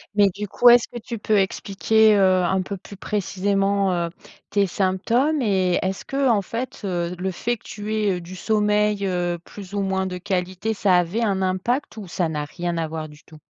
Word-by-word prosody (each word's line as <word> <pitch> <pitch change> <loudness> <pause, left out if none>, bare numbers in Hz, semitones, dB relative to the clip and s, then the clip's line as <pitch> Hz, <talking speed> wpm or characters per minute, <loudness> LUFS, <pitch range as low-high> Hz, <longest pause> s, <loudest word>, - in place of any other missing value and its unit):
Mais, 205 -1 +5
du 205 +3 -6
coup, 245 +5 +5
est-ce 240 -1 +6
que 240 - -8
tu 230 +1 -6
peux 210 0 +1
expliquer, 210 +3 +3
heu, 185 -2 +4
un 190 +2 +1
peu 195 +2 -5
plus 200 +2 -12
précisément, 195 0 0
heu, 170 -1 -1 0.4
tes 200 -1 +2
symptômes 225 - +1
et 190 -5 +2
est-ce 190 +1 -3
qu'en 260 -7 +1
fait, 235 +5 -5
heu, 175 -1 -2
le 190 +1 -2
fait 240 +6 -2
que - - -30
tu 215 +1 -5
aies, 210 -2 +1
heu, - - -7
du 180 +2 -9
sommeil, 210 -1 +1
heu, 175 -1 -1
plus 200 0 -11
ou 205 - 0
moins 190 -1 0
de 180 -1 -4
qualité, 185 +3 -2
ça 200 -2 +2
avait 180 +7 0
un 195 -3 0
impact 205 +8 -1
ou 200 -4 -7
ça 175 -1 -1
n'a 150 -2 -3
rien 175 +2 -4
à 165 -1 -1
voir 155 0 -5
du 150 0 -16
tout? 155 - -16
195 Hz, 210 wpm, -23 LUFS, 180-210 Hz, 0.4 s, est-ce